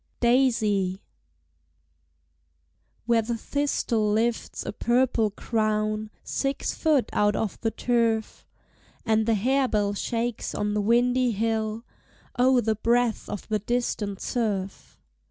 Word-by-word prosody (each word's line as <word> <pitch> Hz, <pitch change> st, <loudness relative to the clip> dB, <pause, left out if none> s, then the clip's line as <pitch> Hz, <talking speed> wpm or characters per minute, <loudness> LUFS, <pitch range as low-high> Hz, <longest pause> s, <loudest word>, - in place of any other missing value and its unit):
DAISY. 220 Hz, -7 st, +2 dB, 2.0 s
Where 235 Hz, -1 st, +3 dB
the 230 Hz, +1 st, -3 dB
thistle 230 Hz, -5 st, 0 dB
lifts 225 Hz, +2 st, -1 dB
a -, -, -4 dB
purple 235 Hz, -1 st, +2 dB
crown 215 Hz, 0 st, -1 dB
Six 275 Hz, 0 st, -2 dB
foot 305 Hz, -6 st, +1 dB
out 205 Hz, 0 st, +2 dB
of 215 Hz, -3 st, -3 dB
the 225 Hz, -, +1 dB
turf, 225 Hz, -1 st, -1 dB, 0.6 s
And 220 Hz, -1 st, +2 dB
the 225 Hz, -, +3 dB
harebell 215 Hz, -3 st, +1 dB
shakes 230 Hz, +3 st, -3 dB
on 210 Hz, 0 st, -1 dB
the 210 Hz, -, +1 dB
windy 245 Hz, +3 st, +2 dB
hill 220 Hz, +1 st, -1 dB, 0.5 s
O 255 Hz, 0 st, +4 dB
the 220 Hz, 0 st, +1 dB
breath 235 Hz, +1 st, 0 dB
of 205 Hz, -, -6 dB
the 215 Hz, -1 st, 0 dB
distant 210 Hz, -3 st, -2 dB
surf! 205 Hz, -6 st, -3 dB
225 Hz, 115 wpm, -26 LUFS, 215-245 Hz, 2.0 s, O